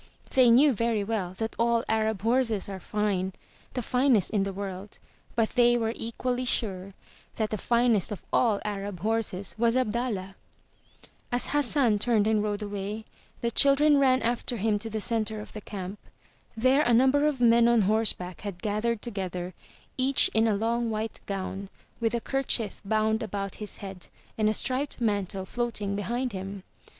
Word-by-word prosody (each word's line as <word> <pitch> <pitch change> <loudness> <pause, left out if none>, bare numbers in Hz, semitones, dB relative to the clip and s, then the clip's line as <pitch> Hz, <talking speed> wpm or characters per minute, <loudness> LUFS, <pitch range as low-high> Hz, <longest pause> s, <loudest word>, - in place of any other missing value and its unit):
They 255 -2 +5
knew 270 +4 +6
very 230 -1 0
well 200 -4 -3
that 225 +1 -3
all 235 0 +2
Arab 220 -2 0
horses 230 -3 +1
are 195 -1 -6
fine, 195 -2 -1 0.4
the 250 - -2
finest 250 -5 +2
in 210 -3 +1
the 195 0 -1
world, 195 +1 -7 0.4
but 225 -2 +1
they 240 -1 +4
were 225 -1 -1
equally 245 +2 -2
sure 195 -6 -2 0.4
that 220 -1 -2
the 215 - -1
finest 235 -4 +2
of 205 - -6
all 220 -5 +3
Arab 200 -2 -4
horses 200 -5 -2
was 235 +1 +3
Abdallah! 220 -5 -1 1.0
As 245 0 +1
Hassan 275 -6 +2
turned 215 -1 +2
and 215 -1 +2
rode 210 0 -2
away, 205 +1 -5 0.4
the 235 - 0
children 280 +3 +5
ran 260 -3 +3
after 240 +1 -1
him 210 0 +1
to 225 +2 -4
the 220 0 -3
center 220 -1 -1
of 210 - -10
the 215 - -7
camp. 195 0 -7 0.6
There 260 +5 +4
a 240 -4 +3
number 265 +4 +4
of 290 -4 -1
men 235 -1 +5
on 235 -3 +4
horseback 195 -4 +1
had 200 -3 -7
gathered 215 +1 -1
together, 185 -5 -4 0.5
each 265 +1 +4
in 220 +1 +3
a 215 - +2
long 230 +3 0
white 220 0 -4
gown, 195 0 -4 0.3
with 230 0 0
a 235 - -1
kerchief 250 -6 -1
bound 220 +2 +1
about 200 -2 -4
his 210 - -4
head, 190 -2 -8 0.3
and 215 -1 +2
a - - +1
striped 265 +6 -1
mantle 200 -4 -1
floating 215 -3 -2
behind 240 +5 -2
him. 195 0 -6
220 Hz, 170 wpm, -27 LUFS, 200-240 Hz, 1.0 s, knew